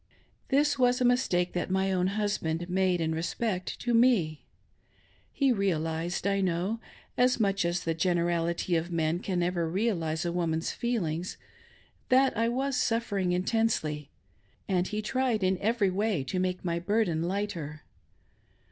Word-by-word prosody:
This 285 Hz, 0 st, +2 dB
was 250 Hz, 0 st, +3 dB
a 250 Hz, -, +2 dB
mistake 215 Hz, -8 st, +2 dB
that 175 Hz, -, -2 dB
my 190 Hz, +1 st, +1 dB
own 180 Hz, -1 st, +1 dB
husband 175 Hz, -5 st, -1 dB
made, 185 Hz, -1 st, +1 dB
in 160 Hz, -1 st, 0 dB
respect 180 Hz, +4 st, -2 dB
to 240 Hz, -, 0 dB
me. 225 Hz, -, +3 dB, 0.8 s
He 275 Hz, -2 st, +2 dB
realised, 170 Hz, -4 st, -1 dB
I 200 Hz, 0 st, +2 dB
know 185 Hz, +5 st, 0 dB, 0.2 s
— -, -, -25 dB
as 250 Hz, 0 st, +4 dB
much 200 Hz, -3 st, +1 dB
as 175 Hz, +1 st, -1 dB
the 165 Hz, -, 0 dB
generality 170 Hz, 0 st, 0 dB
of 165 Hz, +1 st, -1 dB
men 165 Hz, 0 st, +1 dB
ever -, -, -10 dB, 0.4 s
can 160 Hz, -, -4 dB
realise 170 Hz, -5 st, -1 dB
of 170 Hz, -, -1 dB
a -, -, -2 dB
woman's 165 Hz, -1 st, -1 dB
feelings 185 Hz, -8 st, -2 dB, 0.4 s
— -, -, -32 dB
that 260 Hz, +1 st, +4 dB
I 230 Hz, +1 st, +1 dB
was 265 Hz, +2 st, -1 dB
suffering 205 Hz, -6 st, 0 dB
intensely, 180 Hz, -7 st, 0 dB, 0.6 s
and 185 Hz, -2 st, +1 dB
he 215 Hz, 0 st, -3 dB
tried 250 Hz, -2 st, 0 dB
in 185 Hz, 0 st, +1 dB
every 210 Hz, -2 st, +1 dB
way 200 Hz, -5 st, 0 dB
to 135 Hz, +8 st, -3 dB
make 185 Hz, 0 st, -2 dB
my 170 Hz, -1 st, 0 dB
burden 185 Hz, -3 st, +1 dB
lighter. 170 Hz, -5 st, -3 dB
185 Hz, 155 wpm, -29 LUFS, 170-225 Hz, 0.8 s, as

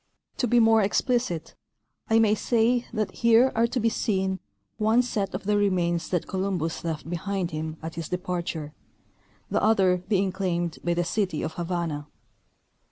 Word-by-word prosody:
To 250 Hz, -, +1 dB
be 240 Hz, +1 st, +4 dB
more 225 Hz, -1 st, +5 dB
explicit, 205 Hz, -, 0 dB, 0.6 s
I 225 Hz, -, +4 dB
may 220 Hz, -2 st, +4 dB
say 235 Hz, +3 st, +1 dB
that 215 Hz, -4 st, -1 dB
here 235 Hz, +4 st, +4 dB
are 230 Hz, +1 st, +3 dB
to 245 Hz, +2 st, -2 dB
be 230 Hz, 0 st, +2 dB
seen 190 Hz, -4 st, -1 dB, 0.4 s
one 220 Hz, +3 st, +4 dB
set 210 Hz, -5 st, -2 dB
of -, -, -5 dB
the 210 Hz, +1 st, +1 dB
remains 175 Hz, -4 st, +1 dB
that 175 Hz, -3 st, 0 dB
Columbus 185 Hz, -4 st, -2 dB
left 160 Hz, -2 st, -4 dB
behind 180 Hz, +1 st, -2 dB
him 155 Hz, 0 st, -4 dB
at 160 Hz, 0 st, -5 dB
his 165 Hz, -2 st, -6 dB
departure, 175 Hz, -4 st, -3 dB, 0.8 s
the -, -, +1 dB
other 190 Hz, -4 st, +4 dB
being 195 Hz, -2 st, +2 dB
claimed 175 Hz, -3 st, -2 dB
by 175 Hz, 0 st, +1 dB
the 175 Hz, -, +1 dB
city 185 Hz, -2 st, -1 dB
of 160 Hz, -, -3 dB
Havana. 170 Hz, -4 st, -3 dB
190 Hz, 165 wpm, -26 LUFS, 170-220 Hz, 0.8 s, more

